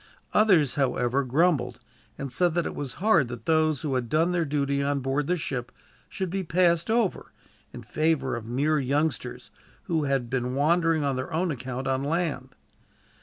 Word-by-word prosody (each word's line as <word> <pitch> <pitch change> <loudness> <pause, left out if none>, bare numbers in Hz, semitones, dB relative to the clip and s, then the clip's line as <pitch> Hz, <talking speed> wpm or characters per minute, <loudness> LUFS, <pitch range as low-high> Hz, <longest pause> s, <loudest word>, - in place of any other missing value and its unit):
Others, 185 - +4
however, 125 +1 +1
grumbled, 130 -3 +1 0.4
and 140 -2 -5
said 175 +5 +1
that 175 - +1
it - - -3
was 140 -3 -5
hard 175 - +3
that 120 -1 -8
those 155 -1 +2
who 145 -3 -1
had 125 -2 -1
done 165 +3 +2
their 175 -2 +1
duty 140 -1 0
on 140 0 0
board 135 +2 -1
the 180 - +1
ship 125 -5 -4 0.4
should 190 -3 -4
be 195 0 -2
passed 170 0 +2
over, 225 -4 0 0.4
in - - -9
favor 155 -4 0
of 115 -2 -7
mere 145 +6 +1
youngsters, 145 +2 -2 0.3
who 160 -3 -1
had 135 -3 0
been 125 0 -2
wandering 165 +2 +2
on 140 -2 0
their 130 +5 -4
own 170 +2 0
account 130 -1 -5
on 135 0 0
land. 145 -4 -2
145 Hz, 175 wpm, -26 LUFS, 130-165 Hz, 0.4 s, Others